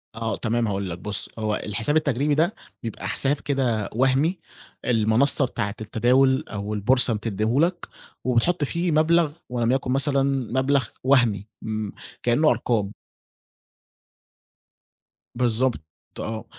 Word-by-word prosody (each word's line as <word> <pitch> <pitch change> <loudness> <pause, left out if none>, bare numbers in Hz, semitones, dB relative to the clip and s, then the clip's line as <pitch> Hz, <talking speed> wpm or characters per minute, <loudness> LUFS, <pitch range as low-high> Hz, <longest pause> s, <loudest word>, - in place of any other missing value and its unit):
آه، 115 -2 -2
تمام 115 0 0
هاقول 100 -2 -2
لك، 85 - -5
بُص، 100 0 0
هو 110 -1 0
الحساب 115 +7 -2
التجريبي 145 -1 +1
ده، 170 +8 +1 0.3
بيبقى 115 -2 -5
حساب 140 +1 +1
كده 125 -7 -1
وهمي 135 - +2 0.5
المنصة 120 +4 +3
بتاعة 105 -4 -3
التداول 130 +6 +2
أو 105 0 -4
البورصة 120 +4 +3
بتدّيه 110 +3 -1
لك 175 +2 0 0.4
وبتحط 130 +7 +1
فيه 170 +4 -1
مبلغ 160 0 +3 0.2
ولم 120 -1 0
يكن 130 -1 0
مثلًا 135 +1 +2 0.4
مبلغ 135 -1 +2 0.2
وهمي 120 -7 +2
م 110 -1 -3 0.3
كإنّه 145 +6 +3
أرقام. 105 -4 0 2.4
بالضبط 120 -2 +2 0.4
آه، 110 0 -5
125 Hz, 120 wpm, -24 LUFS, 110-140 Hz, 2.4 s, المنصة